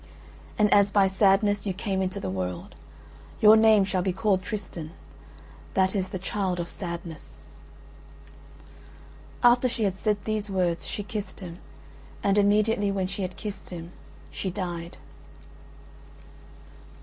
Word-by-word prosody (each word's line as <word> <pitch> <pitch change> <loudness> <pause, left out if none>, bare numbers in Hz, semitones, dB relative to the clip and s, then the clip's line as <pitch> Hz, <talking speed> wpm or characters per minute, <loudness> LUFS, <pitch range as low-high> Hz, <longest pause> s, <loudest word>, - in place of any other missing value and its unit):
And 210 -1 +4
as 200 0 +5
by 200 -1 +4
sadness 200 +1 +3
you 190 - 0
came 195 -1 -2
into 185 0 -2
the 95 - -4
world, 90 -2 -4 0.7
your 215 0 +8
name 220 -2 +6
shall 190 -1 -1
be 190 +1 0
called 190 +1 +1
Tristan; 180 -5 -6 0.8
that 190 +1 +2
is 190 -1 -1
the 190 - -4
child 185 -1 -2
of 170 - -4
sadness." 170 -3 -7 2.0
After 245 +1 +5
she 230 -2 -2
had 190 -2 -1
said 210 -2 +1
these 215 -1 -2
words 180 -3 0
she 205 - -4
kissed 210 0 -6
him, 175 -1 -8 0.6
and 200 +1 +3
immediately 205 0 +3
when 195 -1 -1
she 195 +2 -4
had 185 -1 -4
kissed 210 -1 -7
him 170 -1 -8 0.4
she 190 - -3
died. 175 -3 -5
195 Hz, 135 wpm, -26 LUFS, 180-210 Hz, 2.0 s, your